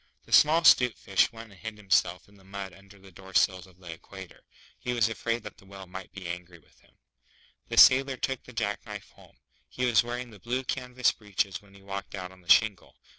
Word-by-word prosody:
The -, -, -18 dB
small 160 Hz, +3 st, +6 dB
'Stute 125 Hz, -6 st, +6 dB
Fish 100 Hz, +4 st, +2 dB
went 115 Hz, -1 st, -11 dB
and 95 Hz, -, -17 dB
hid 110 Hz, -1 st, -7 dB
himself 90 Hz, -4 st, +1 dB
in 100 Hz, -, -22 dB
the 100 Hz, -1 st, -20 dB
mud 95 Hz, -1 st, -7 dB
under 100 Hz, +1 st, -17 dB
the 95 Hz, 0 st, -17 dB
Door 95 Hz, +1 st, -14 dB
sills 95 Hz, -1 st, +2 dB
of 90 Hz, -1 st, -21 dB
the 90 Hz, -3 st, -9 dB
Equator. 95 Hz, +2 st, -12 dB, 0.4 s
He 125 Hz, -, -3 dB
was 115 Hz, -3 st, +3 dB
afraid 115 Hz, +1 st, -3 dB
that 105 Hz, 0 st, -10 dB
the 100 Hz, -, -19 dB
Whale 95 Hz, -1 st, -10 dB
might 95 Hz, +1 st, -9 dB
be 95 Hz, -2 st, -10 dB
angry 90 Hz, 0 st, -7 dB
with 80 Hz, -, -27 dB
him. -, -, -29 dB, 0.7 s
The -, -, -5 dB
Sailor 135 Hz, 0 st, +7 dB
took 135 Hz, -1 st, -2 dB
the -, -, -14 dB
jack 110 Hz, -4 st, -3 dB
knife -, -, -9 dB
home. -, -, -20 dB, 0.3 s
He 125 Hz, -, -2 dB
was 120 Hz, -3 st, +4 dB
wearing 120 Hz, 0 st, -5 dB
the 105 Hz, -, -14 dB
blue 125 Hz, +7 st, -2 dB
canvas 125 Hz, -1 st, 0 dB
breeches 100 Hz, -2 st, -3 dB
when 100 Hz, -1 st, -21 dB
he 100 Hz, -, -17 dB
walked 100 Hz, +1 st, -6 dB
out 90 Hz, -2 st, -7 dB
on 95 Hz, 0 st, -18 dB
the 85 Hz, -, -20 dB
shingle. 105 Hz, -5 st, +3 dB
100 Hz, 225 wpm, -28 LUFS, 95-120 Hz, 0.7 s, Sailor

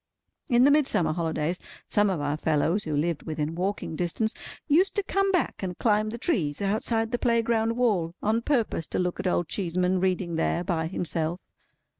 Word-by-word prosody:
In 240 Hz, -1 st, +5 dB
the 285 Hz, -, +6 dB
Midsummer 280 Hz, -, +2 dB
holidays, 165 Hz, +1 st, -1 dB, 0.3 s
some 205 Hz, 0 st, +2 dB
of 185 Hz, -5 st, -1 dB
our 145 Hz, 0 st, -1 dB
fellows 160 Hz, +5 st, +1 dB
who 155 Hz, -2 st, -2 dB
lived 160 Hz, 0 st, 0 dB
within 155 Hz, 0 st, -2 dB
walking 185 Hz, -1 st, -3 dB
distance, 180 Hz, +7 st, -1 dB, 0.3 s
used 345 Hz, +6 st, +3 dB
to 410 Hz, -, +1 dB
come 390 Hz, 0 st, +1 dB
back 360 Hz, -3 st, 0 dB
and 180 Hz, -2 st, -4 dB
climb 215 Hz, -1 st, +2 dB
the 230 Hz, -, -5 dB
trees 180 Hz, -, -1 dB
outside 225 Hz, +3 st, 0 dB
the 245 Hz, -, -1 dB
playground 230 Hz, -1 st, +1 dB
wall, 190 Hz, -9 st, +1 dB
on 220 Hz, +2 st, +1 dB
purpose 230 Hz, -, 0 dB
to -, -, -3 dB
look 180 Hz, -1 st, -1 dB
at -, -, -1 dB
Old 175 Hz, -2 st, +1 dB
Cheeseman 180 Hz, 0 st, 0 dB
reading 180 Hz, -2 st, 0 dB
there 170 Hz, +1 st, 0 dB
by 165 Hz, -3 st, -1 dB
himself. 165 Hz, -1 st, -2 dB
185 Hz, 180 wpm, -26 LUFS, 165-230 Hz, 0.3 s, the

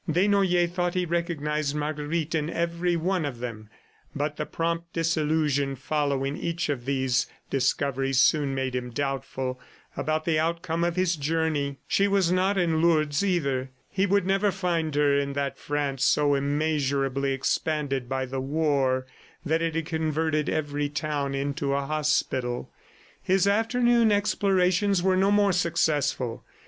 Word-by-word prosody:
Desnoyers 180 Hz, 0 st, +3 dB
thought 175 Hz, 0 st, -1 dB
he 180 Hz, -1 st, +1 dB
recognized 155 Hz, -4 st, -1 dB
Marguerite 150 Hz, +2 st, -2 dB
in 155 Hz, -1 st, 0 dB
every 170 Hz, +1 st, -1 dB
one 180 Hz, +1 st, 0 dB
of 140 Hz, -5 st, -4 dB
them, 115 Hz, -3 st, -7 dB, 0.5 s
but 145 Hz, +1 st, -2 dB
the -, -, -4 dB
prompt 170 Hz, 0 st, -2 dB
disillusion 155 Hz, -4 st, +1 dB
following 140 Hz, 0 st, -1 dB
each 170 Hz, 0 st, -2 dB
of 130 Hz, -4 st, -2 dB
these 130 Hz, -2 st, +1 dB, 0.2 s
discoveries 135 Hz, 0 st, +1 dB
soon 140 Hz, -3 st, +3 dB
made 130 Hz, -1 st, -2 dB
him 125 Hz, -1 st, -3 dB
doubtful 130 Hz, 0 st, -3 dB, 0.4 s
about 155 Hz, 0 st, -1 dB
the 160 Hz, -2 st, +2 dB
outcome 165 Hz, +1 st, -1 dB
of 170 Hz, 0 st, 0 dB
his 185 Hz, -2 st, +1 dB
journey. 150 Hz, -2 st, -1 dB
She 200 Hz, -, +2 dB
was 195 Hz, -3 st, +2 dB
not 190 Hz, +2 st, +2 dB
in 165 Hz, -3 st, +1 dB
Lourdes, 155 Hz, -2 st, +2 dB
either. 140 Hz, -9 st, 0 dB, 0.2 s
He 195 Hz, +1 st, +1 dB
would 200 Hz, -1 st, +2 dB
never 195 Hz, +2 st, +2 dB
find 170 Hz, -5 st, -1 dB
her 145 Hz, -1 st, +3 dB
in 140 Hz, 0 st, -2 dB
that 140 Hz, -1 st, -3 dB
France 145 Hz, -2 st, -2 dB
so 145 Hz, 0 st, +3 dB
immeasurably 140 Hz, -1 st, 0 dB
expanded 135 Hz, -1 st, -1 dB
by 130 Hz, 0 st, -1 dB
the 130 Hz, +1 st, -4 dB
war 135 Hz, -3 st, +1 dB, 0.4 s
that 160 Hz, +2 st, +1 dB
it 165 Hz, -1 st, -1 dB
had 165 Hz, -1 st, -1 dB
converted 160 Hz, -1 st, -1 dB
every 145 Hz, -1 st, -1 dB
town 145 Hz, -2 st, -2 dB
into 140 Hz, 0 st, -1 dB
a 140 Hz, 0 st, -1 dB
hospital. 135 Hz, -5 st, -1 dB, 0.5 s
His 190 Hz, 0 st, +2 dB
afternoon 230 Hz, +2 st, +3 dB
explorations 195 Hz, -2 st, +2 dB
were 190 Hz, 0 st, +3 dB
no 190 Hz, +1 st, +3 dB
more 205 Hz, -1 st, +4 dB
successful. 145 Hz, -8 st, 0 dB
155 Hz, 145 wpm, -26 LUFS, 140-170 Hz, 0.5 s, more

